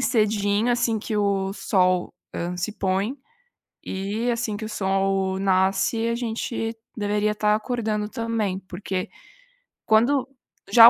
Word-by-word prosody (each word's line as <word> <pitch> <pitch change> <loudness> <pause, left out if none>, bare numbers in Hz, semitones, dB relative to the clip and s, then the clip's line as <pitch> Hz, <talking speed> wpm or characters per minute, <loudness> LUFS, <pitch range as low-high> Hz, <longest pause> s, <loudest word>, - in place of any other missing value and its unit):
cedinho, 215 -2 +2
assim, 235 -2 +1
que 215 0 -3
o 195 -2 +1
sol, 185 -4 +2 0.2
hã, 175 +1 -2
se 180 +4 -2
põe, 195 +6 0 0.7
eh, 205 +5 -1
assim, 230 -3 -1
que 220 - -5
o - - -4
sol 195 -1 +1
nasce, 195 +4 +2
a 235 - +1
gente 230 -1 -2 0.2
deveria 210 0 +1
tá 210 0 +3
acordando 215 -2 -1
também, 220 -5 -1
porque 185 0 -4 0.8
quando 250 +5 +4 0.4
já 230 -1 +11
210 Hz, 125 wpm, -24 LUFS, 195-230 Hz, 0.8 s, já